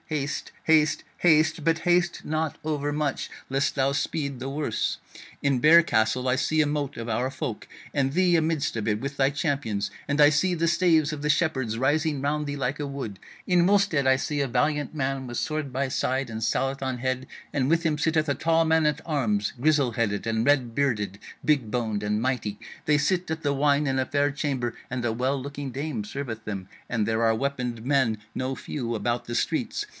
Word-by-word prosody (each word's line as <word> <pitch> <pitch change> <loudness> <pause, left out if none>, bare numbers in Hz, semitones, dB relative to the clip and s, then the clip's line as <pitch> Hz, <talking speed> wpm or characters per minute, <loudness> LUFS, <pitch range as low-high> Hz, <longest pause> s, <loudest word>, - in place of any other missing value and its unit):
Haste, 145 -2 -3
haste, 155 -1 +3 0.2
haste! 155 -1 +3
But 165 +1 +3
haste 175 0 +1
not 155 0 -1
overmuch, 145 -1 -1 0.2
lest 135 +1 0
thou 135 0 +2
speed 140 -2 -2
the 130 +2 -4
worse: 140 -4 -1 0.4
in 140 -3 +2
Bear 165 +5 +8
Castle 125 -2 +1
I 125 - +3
see 155 +3 0
a 155 - +5
mote 145 -1 -2
of 115 0 -5
our 125 +3 -1
folk, 125 -4 -5 0.3
and 135 -2 +1
thee 180 +2 +3
amidst 155 -4 +1
of 110 -1 -1
it 105 0 0
with 140 +3 -4
thy 135 -1 +3
champions, 140 - -1 0.2
and 145 +1 0
I 145 -1 +8
see 165 +5 +2
the 170 -1 0
staves 165 -3 +3
of 145 - -5
the 150 - -1
Shepherds 130 -8 +1
rising 145 +3 +1
round 150 +2 -1
thee 145 0 -4
like 135 +2 -2
a 145 - -2
wood. 130 -9 -6 0.3
In 175 -1 +4
Wulstead 190 -8 +3
I 130 0 +5
see 145 +1 -1
a 135 - -1
valiant 150 +4 0
man 135 -2 -2
with 120 -1 -5
sword 155 -3 -2
by 135 +2 -1
side 130 0 -1
and 110 0 -4
sallet 135 +4 0
on 130 -2 -2
head, 130 +1 -2 0.3
and 135 -2 +1
with 165 +1 +2
him 155 -2 +1
sitteth 155 0 +1
a 140 - +2
tall 165 +3 +2
man 160 0 +3
at 150 - 0
arms 110 -10 0
grizzle 145 -4 +3
headed 105 -3 -1
and 115 0 0
red 130 -5 +2
bearded, 105 -8 0 0.3
big 140 -7 +2
boned 110 -4 -1
and 105 +1 0
mighty; 120 -5 -1 0.3
they 150 -1 +4
sit 175 +4 0
at 160 0 -3
the 145 -1 +1
wine 145 +1 +2
in 135 0 0
a 130 - +1
fair 145 +1 +1
chamber, 135 -4 -2
and 125 -1 -3
a 115 - +1
well 130 +4 0
looking 140 0 -6
dame 135 -4 -3
serveth 115 -1 -5
them; 100 -3 -5 0.2
and 110 -3 0
there 115 0 +1
are 115 0 +3
weaponed 125 -2 -3
men 130 -5 +2 0.2
no 130 +1 -2
few 120 -5 -4
about 120 +3 -1
the 120 - -4
streets. - - -1
140 Hz, 205 wpm, -26 LUFS, 125-150 Hz, 0.4 s, Bear